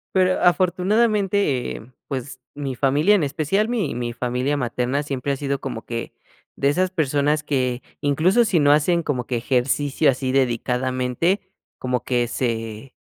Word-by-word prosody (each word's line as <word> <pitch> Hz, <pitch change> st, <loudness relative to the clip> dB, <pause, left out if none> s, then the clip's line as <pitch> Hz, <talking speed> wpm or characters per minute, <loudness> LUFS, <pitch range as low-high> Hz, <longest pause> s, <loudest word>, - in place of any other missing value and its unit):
pero 185 Hz, -1 st, +3 dB
afortunadamente, 190 Hz, -, +2 dB
eh, 120 Hz, +4 st, -11 dB, 0.2 s
pues 130 Hz, -1 st, -5 dB
mi 140 Hz, -2 st, -4 dB
familia, 145 Hz, -, +3 dB
en 180 Hz, -, +1 dB
especial 155 Hz, +10 st, 0 dB
mi 220 Hz, -, -1 dB
mi 120 Hz, -1 st, -3 dB
familia 125 Hz, +4 st, -1 dB
materna, 125 Hz, +2 st, -1 dB
siempre 140 Hz, -1 st, -3 dB
ha 135 Hz, -, -1 dB
sido 140 Hz, -1 st, -2 dB
como 115 Hz, -, -5 dB
que 115 Hz, -1 st, -5 dB, 0.4 s
de 140 Hz, -, +1 dB
esas 185 Hz, +5 st, +1 dB
personas 150 Hz, -2 st, +1 dB
que, 130 Hz, -3 st, -1 dB, 0.2 s
incluso 160 Hz, -, +3 dB
si 190 Hz, -6 st, +2 dB
no 145 Hz, -1 st, +5 dB
hacen 170 Hz, +3 st, +2 dB
como 125 Hz, -5 st, -2 dB
que 125 Hz, -2 st, -2 dB
ejercicio 135 Hz, +4 st, +1 dB
así 130 Hz, 0 st, -3 dB
dedicadamente, 130 Hz, -, 0 dB, 0.4 s
como 125 Hz, -1 st, -2 dB
que 120 Hz, -2 st, 0 dB
se 115 Hz, 0 st, -3 dB
140 Hz, 150 wpm, -22 LUFS, 125-170 Hz, 0.4 s, no